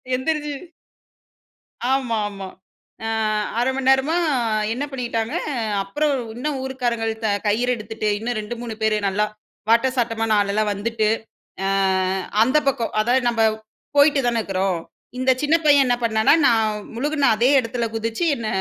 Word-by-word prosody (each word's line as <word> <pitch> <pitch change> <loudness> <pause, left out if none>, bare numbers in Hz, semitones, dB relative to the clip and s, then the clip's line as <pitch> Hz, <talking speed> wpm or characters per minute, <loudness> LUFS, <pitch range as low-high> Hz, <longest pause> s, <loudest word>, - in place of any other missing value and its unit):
எந்திரிச்சு 295 +2 -2 1.4
ஆமா 260 -3 +1
ஆமா. 195 -2 -8 0.6
ஆ. - - -1 0.5
1/2 245 +2 +2
மணி 270 -1 -3
நேரமா, 270 +5 +3
க 225 -7 0
என்ன 275 +4 -3
பண்ணிக்கிட்டாங்க. 240 -1 -3 0.5
அப்புறம் 290 +10 -1 0.2
இன்னும் 270 +3 -3
ஊருக்காரங்க 245 -3 -2 0.4
கயிறு 235 +4 +1
எடுத்துட்டு, 215 0 -4
இன்னும் 235 +2 -3
2,3 230 +1 -6
பேரு 220 -1 +2
நல்லா 200 +2 +1 0.5
வாட்ட 235 +3 +4
சாட்டமான 225 -2 +1
ஆள்லாம், 205 +1 0
வந்துட்டு. 215 +1 -1 0.6
அ - - +1 0.7
அந்த 260 +6 +4
பக்கம் 260 -4 -1
அதாவது 245 +4 +2
நம்ம 230 -1 -3 0.6
போயிட்டு 285 0 +5
தானே 235 -1 +1
இருக்கிறோம். 190 -2 -1 0.4
இந்த 255 +1 +2
சின்ன 300 +2 +2
பையன் 285 -2 +6
என்ன 245 -1 +2
பண்ணான்னா? 220 +4 +4
நான் 215 -3 +1
முழுகின 285 +2 +1
அதே 245 +4 +3
இடத்தில் 230 -1 -3
குதிச்சு, 225 +8 -2
என்ன 230 -2 -5
235 Hz, 135 wpm, -22 LUFS, 220-265 Hz, 1.4 s, பையன்